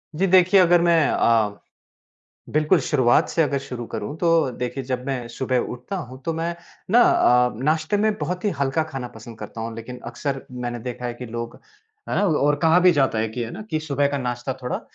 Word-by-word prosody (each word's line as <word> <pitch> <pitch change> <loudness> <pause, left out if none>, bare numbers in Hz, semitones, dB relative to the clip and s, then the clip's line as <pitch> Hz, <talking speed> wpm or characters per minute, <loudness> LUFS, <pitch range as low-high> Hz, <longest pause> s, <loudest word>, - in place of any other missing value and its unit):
जी, 190 +5 +1
देखिए, 185 +1 +5
अगर 175 -1 +5
मैं 170 -2 +4
अ, 110 -3 +2 0.9
बिल्कुल 155 +3 +3
शुरुआत 130 -3 +3
से 165 - +1
अगर 145 -2 0
शुरू 125 -3 -7
करूँ, 110 +9 -5
तो 165 -5 +3
देखिए, 125 +2 -3
जब 125 0 -3
मैं 130 -3 -3
सुबह 130 +2 -1
उठता 125 +10 -4
हूँ 130 -7 -8
तो 165 - -1
मैं 165 +1 -2 0.4
ना 235 +4 +6
अ, 125 - +4
नाश्ते 155 +5 +1
में 215 +1 +2
बहुत 180 +5 -3
ही 205 - +2
हल्का 140 +3 +1
खाना 130 -2 -4
पसंद 115 0 -11
करता 110 +1 -8
हूँ, 115 0 -4
लेकिन 125 +2 -8
अक्सर 135 -2 -4
मैंने 120 -1 -4
देखा 125 +1 -5
है 120 - -4
कि 125 +1 -8
लोग 115 0 -6 0.5
और 150 -7 +2
कहा 165 +1 +5
भी 180 0 +6
जाता 135 -7 +1
है 110 +1 0
कि 120 +3 -4
है 115 - -5
ना 215 - -7
कि 155 - 0
सुबह 145 -2 0
का 140 0 -2
नाश्ता 125 0 -3
थोड़ा 125 - -3
135 Hz, 205 wpm, -23 LUFS, 120-165 Hz, 0.9 s, ना